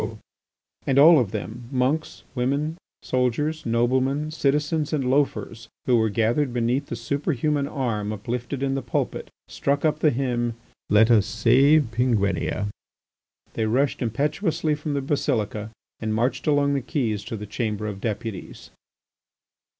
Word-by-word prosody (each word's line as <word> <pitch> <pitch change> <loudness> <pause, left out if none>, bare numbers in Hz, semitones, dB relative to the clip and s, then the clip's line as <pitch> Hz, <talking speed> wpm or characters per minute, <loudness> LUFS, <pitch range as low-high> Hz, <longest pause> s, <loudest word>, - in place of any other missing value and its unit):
and 135 - +2
all 155 +2 +8
of 120 -6 0
them, 110 +3 -6
monks, 135 +4 -1
women, 140 +5 -1 0.3
soldiers, 130 +4 -1
noblemen, 130 +6 +1
citizens, 150 +1 0
and 135 -4 0
loafers, 125 -4 0 0.2
who 125 - +3
were 110 -1 +3
gathered 115 +6 +1
beneath 125 +4 0
the - - -4
superhuman 140 +3 -1
arm 115 -8 -2
uplifted 120 +5 -4
in 135 0 0
the 135 - -1
pulpit, 120 - -3 0.2
struck 140 +2 -1
up 155 -1 +1
the 155 - +4
hymn, 120 -3 -1 0.3
"Let 110 +3 +5
us 105 -4 +4
save 140 +5 +4
Penguinia!" 105 -4 0 0.8
They 110 - -1
rushed 130 +6 +1
impetuously 150 - 0
from 150 0 -3
the 140 - 0
basilica 110 -6 -1 0.3
and 110 -1 -2
marched 120 +7 -1
along 145 -1 +3
the 140 - 0
quays 115 - -2
to 115 - -5
the 105 - -6
Chamber 105 0 -3
of 100 -2 -5
Deputies. 110 -3 -5
125 Hz, 140 wpm, -24 LUFS, 115-145 Hz, 0.8 s, all